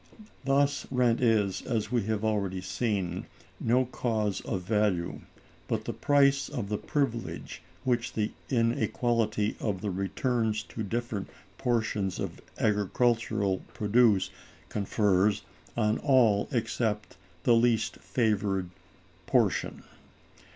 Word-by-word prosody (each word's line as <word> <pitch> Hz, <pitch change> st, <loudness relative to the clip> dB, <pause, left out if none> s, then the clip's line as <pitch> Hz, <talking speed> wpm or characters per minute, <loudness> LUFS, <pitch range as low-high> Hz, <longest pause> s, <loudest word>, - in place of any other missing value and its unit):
Thus 140 Hz, +1 st, +2 dB
rent 125 Hz, -2 st, +2 dB
is, 110 Hz, -5 st, +2 dB
as 110 Hz, -3 st, -2 dB
we 120 Hz, -2 st, +2 dB
have 110 Hz, 0 st, -1 dB
already 100 Hz, -4 st, 0 dB
seen, 95 Hz, -1 st, -2 dB, 0.3 s
no 125 Hz, +3 st, +3 dB
cause 110 Hz, -5 st, -1 dB
of 90 Hz, -, -3 dB
value, 100 Hz, -4 st, 0 dB, 0.5 s
but -, -, -2 dB
the -, -, -3 dB
price 140 Hz, -1 st, +3 dB
of 120 Hz, -9 st, -4 dB
the 105 Hz, -, -1 dB
privilege 130 Hz, -6 st, -2 dB, 0.2 s
which 120 Hz, -2 st, 0 dB
the 110 Hz, -1 st, -1 dB, 0.2 s
inequality 115 Hz, -2 st, +1 dB
of 100 Hz, -4 st, -2 dB
the 105 Hz, -1 st, -2 dB
returns 105 Hz, +3 st, 0 dB
to 115 Hz, -, -7 dB
different 110 Hz, -1 st, -3 dB, 0.3 s
portions 110 Hz, -6 st, 0 dB
of -, -, -4 dB, 0.2 s
agricultural 105 Hz, -1 st, +1 dB, 0.2 s
produce 105 Hz, -2 st, +3 dB, 0.4 s
confers 100 Hz, -1 st, +2 dB, 0.3 s
on 110 Hz, -2 st, +2 dB
all 120 Hz, -8 st, +4 dB
except 110 Hz, -4 st, -1 dB, 0.3 s
the 120 Hz, -, +5 dB
least 115 Hz, -1 st, +2 dB
favored 100 Hz, -6 st, 0 dB, 0.6 s
portion. -, -, +1 dB
110 Hz, 110 wpm, -29 LUFS, 100-120 Hz, 0.6 s, the